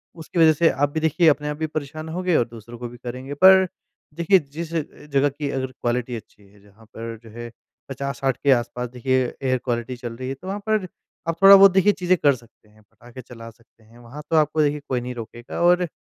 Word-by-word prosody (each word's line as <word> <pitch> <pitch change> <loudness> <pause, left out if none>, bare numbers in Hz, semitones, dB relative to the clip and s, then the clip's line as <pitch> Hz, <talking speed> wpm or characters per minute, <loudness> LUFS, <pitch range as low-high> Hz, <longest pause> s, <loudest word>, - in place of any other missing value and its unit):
उसकी 165 +1 -5
वजह 160 -1 +6
से 165 +2 +3
आप 145 +1 0
भी 160 +2 -3
देखिए 160 +2 +2
अपने 150 0 0
आप 150 - -4
भी 160 0 -2
परेशान 155 +1 -6
होंगे 180 +1 -1
और 120 - +2
दूसरों 115 0 -12
को 120 - -5
भी 120 - -13
करेंगे 125 +3 -7
पर 190 0 +8 0.5
देखिए 170 +4 +3
जिस 160 +2 -8
अ, 165 - +1 0.3
जगह 140 -1 +1
कि 145 +1 -5
अगर 130 -1 -2
क्वालिटी 120 0 -3
अच्छी 105 -2 -12
है, 100 +1 -22
जहाँ 105 +2 -21
पर 115 0 -6
जो 115 - -13
है 120 0 -7 0.4
50-60 135 -1 -3
के 140 - +4
आस-पास 125 0 0
देखिए 130 +1 0 0.2
एयर 130 -1 +1
क्वालिटी 120 0 -2
चल 120 -1 -7
रही 130 +2 -6
है, - - -2
तो 160 +8 -13
वहाँ 195 +2 -3
पर 215 -4 +1 0.4
आप 165 0 -1
थोड़ा 195 0 +10
बहुत 195 0 +8
देखिए 190 +2 +4
चीजें 180 0 +1
कर 140 -2 +5
सकते 115 -3 -21
हैं। 110 0 -23
पटाखे 120 +4 -14
चला 115 -1 -11
सकते 115 0 -24
हैं, 115 +2 -20
वहाँ 120 +5 -10
तो 165 - +1
आपको 155 +1 +2
देखिए 150 0 +1
कोई 125 -2 -1
नहीं 125 +1 -5
रोकेगा 120 +3 -7
और 175 0 +4
135 Hz, 230 wpm, -22 LUFS, 120-160 Hz, 0.5 s, थोड़ा